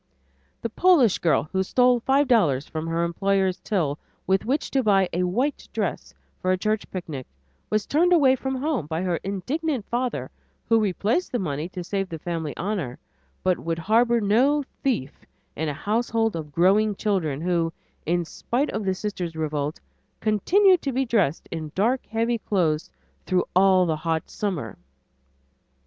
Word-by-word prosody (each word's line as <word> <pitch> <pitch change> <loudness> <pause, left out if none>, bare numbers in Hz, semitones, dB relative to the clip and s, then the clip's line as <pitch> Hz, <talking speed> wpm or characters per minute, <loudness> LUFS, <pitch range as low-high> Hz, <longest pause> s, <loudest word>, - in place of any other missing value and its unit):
The 230 - -1
Polish 290 - +4
girl 165 - +2
who 190 - +1
stole 245 +5 +3
five 270 +4 +2
dollars 155 - +3
from 160 0 -5
her 165 +1 0
employer's 190 +2 +1
till 160 -9 -1 0.3
with 190 0 +1
which 275 +6 -1
to 270 - +2
buy 195 -5 +3
a 175 - 0
white 250 +11 -1
dress - - -3 0.3
for 185 - +1
a 185 - +2
church 215 +2 -1
picnic 155 -8 -6 0.4
was 215 -1 0
turned 345 +5 +2
away 280 -7 +5
from 265 +1 -3
home 265 - -1
by 160 +3 -2
her 180 -2 0
indignant 250 - -3
father 245 +1 -2 0.4
who 225 -1 +4
replaced 215 - 0
the 245 - 0
money 155 -4 -3
to 180 -1 -6
save 195 +1 -2
the 165 - -5
family 160 -2 -4
honor, 180 - -3 0.5
but 185 -1 +2
would 165 0 -2
harbor 230 +7 +3
no 255 +8 +3 0.2
"thief" 225 - -2 0.3
in 160 +1 -2
a - - -2
household 225 +4 0
of 155 -3 -6
growing 200 +6 +3
children 180 -10 -1
who, 170 -1 0 0.3
in 175 +2 0
spite 255 - -2
of - - -3
the 190 -1 0
sister's 180 -5 -4
revolt, 150 -1 -2 0.4
continued 360 - +4
to 275 - -2
be 265 +1 0
dressed 200 - +1
in 155 -2 -5
dark 235 +7 +1
heavy 230 +1 0
clothes 165 -8 0 0.4
through 185 -1 +2
all 185 -1 +5
the 160 -2 0
hot 160 0 -2
summer. 170 - -3
195 Hz, 165 wpm, -24 LUFS, 165-235 Hz, 0.5 s, away